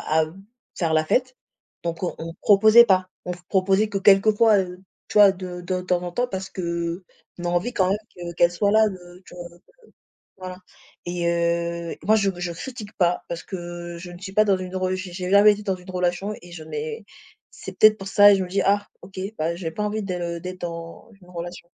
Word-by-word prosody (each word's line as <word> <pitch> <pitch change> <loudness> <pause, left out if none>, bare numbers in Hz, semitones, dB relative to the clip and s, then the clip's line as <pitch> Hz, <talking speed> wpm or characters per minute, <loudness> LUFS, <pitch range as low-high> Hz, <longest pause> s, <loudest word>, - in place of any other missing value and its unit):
à 160 0 +3
b 160 - -13 0.4
faire 165 -3 0
la 155 0 +3
fête, 255 +8 0 0.5
donc 170 +1 -4
on 180 - -1
on 165 +1 -7
proposait 215 +3 +7
pas, 185 -3 +2 0.2
on 180 - -5 0.2
proposait 195 +2 +2
que 200 -2 -2
quelquefois, 210 +2 +5
heu, 180 -1 -3 0.3
tu - - 0
vois, 200 -1 +9
de 180 -1 -7
de 180 +1 -2
temps 180 -1 0
en 175 - -4
temps 245 +8 -1
parce 190 -4 -6
qu'on 170 -1 -3 0.5
a 175 - 0
envie 175 +8 0
quand 185 -6 +2
même 195 - +2 0.2
que 175 -1 -6
qu'elle 175 0 +4
soit 200 +4 0
là, 220 0 +6
heu, 180 -2 -6
tu - - -14
vois? 175 -1 -8
Donc 170 0 -20
heu. - - -47 0.8
Voilà, 185 -1 -8 0.5
et 175 -1 -2
heu, 170 0 -1
moi 215 +3 +4
je 200 -2 +2
je 175 -1 -4
critique 215 +2 -8
pas 175 -1 +1
parce 170 -1 -5
que 175 -2 -7
je 175 +1 -9
ne 175 - -11
suis 190 0 -7
pas 215 +2 +4
dans 200 -2 +3
une 185 0 -6
re 185 0 0
j'ai 185 -1 -5
jamais 205 +1 +7
été 210 - -9
dans 190 -2 0
une 180 +1 -12
relation 180 +3 -1
et 175 -1 -13
je 160 -2 -8
n'ai 450 - -6 0.5
c'est - - -9
peut-être 215 0 +6
pour 195 - -9
ça 205 +1 +7
et 200 - +6
je 190 - -1
me 180 - -9
dis: 195 +2 0
«Ah 205 +1 +2 0.2
OK, 190 -1 -12 0.2
bah 165 +2 -1
j'ai 170 -3 -4
pas 210 - -4
envie 210 +1 -2
de 175 -2 -3
d'être 185 +2 -8
dans 170 +4 -7
une 180 0 -18
relation». 175 0 -7
185 Hz, 225 wpm, -23 LUFS, 175-200 Hz, 0.8 s, vois